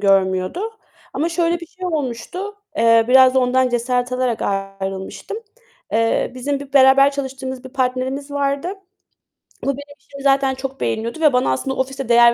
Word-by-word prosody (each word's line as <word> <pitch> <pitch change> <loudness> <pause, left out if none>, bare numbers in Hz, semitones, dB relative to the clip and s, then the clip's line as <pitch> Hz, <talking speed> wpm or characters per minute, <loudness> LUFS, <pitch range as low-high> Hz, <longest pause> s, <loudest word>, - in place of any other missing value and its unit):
görmüyordu 190 - +2 0.5
ama 325 - 0
şöyle 340 0 0
bir 335 - -8
şey 370 +2 -7
olmuştu. 335 - -4 0.2
Eee, 230 -2 +5
biraz 260 0 +7
da - - +5
ondan 255 0 +3
cesaret 245 +1 0
alarak 255 -2 0
ayrılmıştım. 195 - -4 0.6
Eee, 225 +2 +1
bizim 275 +2 -2
bir 280 -1 -10
beraber 275 +1 +6
çalıştığımız 265 -1 -5
bir 260 - -7
partnerimiz 260 +2 -2
vardı. 280 +3 -1 1.0
Bu - - -3
benim 285 +1 -4
işimi 280 -1 -12
zaten 270 -1 +3
çok 270 +1 -6
beğeniyordu 230 +7 -2
ve 300 -4 +5
bana 250 - +2
aslında 265 - -2
ofiste 265 -1 -3
değer 235 0 +7
260 Hz, 155 wpm, -20 LUFS, 240-280 Hz, 1.0 s, biraz